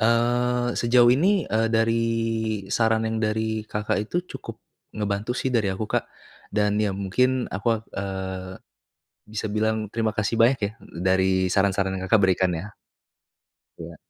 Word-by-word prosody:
Eee, 120 +2 +2
sejauh 120 0 +5
ini, 185 +7 +2
eee, 110 +1 +1
dari 115 +1 +2 0.7
saran 110 0 +2
yang 110 - -2
dari 110 0 -1
Kakak 105 -1 -2
itu. 115 - -5 0.2
cukup - - -10 0.3
ngebantu 105 +2 -2
sih 130 - -1
dari 110 -5 +2
aku 110 +3 -3
Kak. - - 0 0.5
Dan 105 0 +1
ya 105 -2 +1
mungkin, 125 +7 0
aku 100 +3 -6
ak - - -22
eee, 95 -1 -4 0.8
bisa 110 0 -4
bilang 110 0 0
terima 110 -1 0
kasih 105 +2 0
banyak 125 +3 +4
ya, 100 - 0
d 85 - -11
dari 95 0 +3 0.2
saran-saran 95 -1 +1
yang 95 - -4
Kakak 110 - +6
berikan 95 -1 +3
ya. 105 +6 -7 1.0
Iya. - - -9
110 Hz, 155 wpm, -24 LUFS, 100-115 Hz, 1.0 s, Kakak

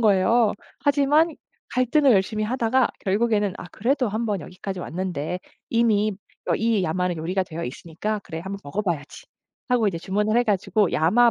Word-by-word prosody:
거예요. 215 +1 +4 0.3
하지만 290 +3 +3 0.4
갈등을 255 +2 +4
열심히 210 +2 +1
하다가 240 +2 +2 0.2
결국에는 205 0 +2
'아 - - -7
그래도 250 +2 +1
한번 215 -2 -1
여기까지 185 +1 -6
왔는데 180 -2 -3 0.3
이미 215 -3 +2 0.3
어 - - +2
이 225 -3 +1
야마 180 +2 0
요리가 175 +4 -1
되어 170 -2 -6
있으니까 170 +11 -4
그래 160 -4 -7
한번 195 +3 -5
먹어 145 +9 -2
봐야지.' 165 -7 -4 0.4
하고 245 -3 +3
이제 185 -5 0
주문을 210 +5 0
해 245 - +3
가지고 205 -1 +1
야마 225 +10 +4
210 Hz, 365 characters per minute, -24 LUFS, 185-235 Hz, 0.4 s, 거예요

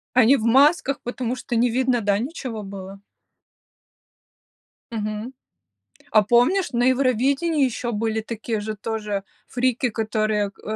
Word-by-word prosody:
Они 255 +2 +6
в 220 - -4
масках, 275 +3 +4
потому 245 0 -3
что 240 -2 -4
не 240 +1 +3
видно, 250 -1 +1
да, 200 0 +2
ничего 245 -4 -5
было? 195 0 -9 1.9
Мгм. 215 +3 -4 0.8
А 215 - +6
помнишь, 255 - +3
на 240 - +1
Евровидении 275 +4 +1
ещё 240 -1 -3
были 220 +1 -1
такие 225 0 -4
же 215 +1 -4
тоже 210 -2 -3 0.2
фрики, 250 0 0
которые 215 -2 -1
г - - -22
230 Hz, 130 wpm, -23 LUFS, 215-255 Hz, 1.9 s, Они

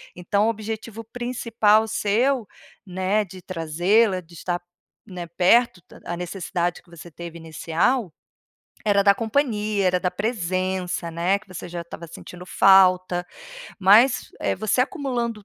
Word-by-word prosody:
então 200 +4 0
o - - +3
objetivo 220 0 -5
principal 225 -2 +1
seu, 225 +3 0 0.4
né, 190 +3 0
de 190 -1 -12
trazê-la, 185 +5 +1
de 170 -1 -16
estar, 175 +1 -3 0.5
né, 180 -4 -7
perto 185 +5 +3
ta - - -17
a 175 - -4
necessidade 175 0 -3
que - - -27
você 170 0 -12
teve 170 +1 -9
inicial 165 - -1 0.7
era 200 -1 +4
da 200 0 +5
companhia, 215 -4 0
era 180 - +2
da 180 - -1
presença, 185 -4 -2
né, 175 +4 +1
que 215 - -22
você 185 -2 -8
já 175 - -5
estava 170 0 -9
sentindo 180 +2 -11
falta. 185 -2 +4 0.5
Mas, 215 +7 +5
eh, - - 0
você 220 +3 0
acumulando 245 - -2
195 Hz, 140 wpm, -23 LUFS, 175-220 Hz, 0.7 s, da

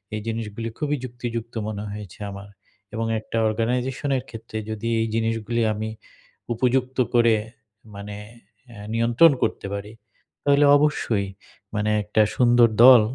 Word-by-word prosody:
এই 105 - -4
জিনিসগুলি 115 0 -4
খুবই 150 -1 -1
যুক্তিযুক্ত 120 -2 -5
মনে 105 -1 -4
হয়েছে 105 -2 -9
আমার। 100 +1 -9 0.4
এবং 115 0 -2
একটা 115 - -5
অর্গানাইজেশনের 125 +4 -1
ক্ষেত্রে 110 -1 -8
যদি 110 +1 -4
এই 115 - +1
জিনিসগুলি 115 +1 -1
আমি 110 +1 -4 0.6
উপযুক্ত 130 +2 0 0.2
করে 115 -2 +5 0.6
মানে 100 +1 -7 0.6
আ - - -12 0.2
নিয়ন্ত্রণ 120 +8 +5
করতে - - -1
পারি। 100 +1 -5 0.5
তাহলে 145 0 +4
অবশ্যই 120 -9 0 0.5
মানে 105 0 0
একটা 105 +1 +2
সুন্দর 120 -1 +5 0.2
দল 125 -3 +10
115 Hz, 130 wpm, -23 LUFS, 110-125 Hz, 0.6 s, দল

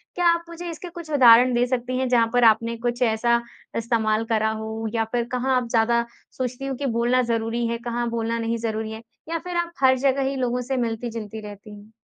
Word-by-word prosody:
क्या 355 - 0
आप 340 0 -4
मुझे 345 +1 -7
इसके 340 +2 -7
कुछ 340 -2 -10
उदाहरण 250 -2 +7
दे 240 +1 +3
सकती 255 0 -2
हैं, 260 0 0
जहाँ 235 -2 +4
पर 245 -1 +3
आपने 230 +1 0
कुछ 240 +1 -3
ऐसा 235 +1 +2 0.4
इस्तेमाल 225 -1 +1
करा 220 0 +2
हो, 220 0 -4
या 225 -1 +1
फिर 240 -1 +1
कहाँ 255 +1 +1
आप 245 -2 -1
ज़्यादा 235 +1 +2 0.3
सोचती 255 +1 -3
हो 270 - -2
कि 280 - -4
बोलना 240 +1 +2
ज़रूरी 230 +1 -1
है, 235 0 -2
कहाँ 240 0 -3
बोलना 230 0 -2
नहीं 230 0 -1
ज़रूरी 220 -1 -3
है? 220 +1 -7 0.3
या 330 0 -1
फिर 355 +1 -5
आप 340 0 -1
हर 260 0 +6
जगह 270 +1 +1
ही 275 - -3
लोगों 250 -1 -1
से 260 +1 -2
मिलती-जुलती 225 -2 -4
रहती 205 +1 -11
हैं? 205 +1 -15
235 Hz, 220 wpm, -23 LUFS, 225-255 Hz, 0.4 s, उदाहरण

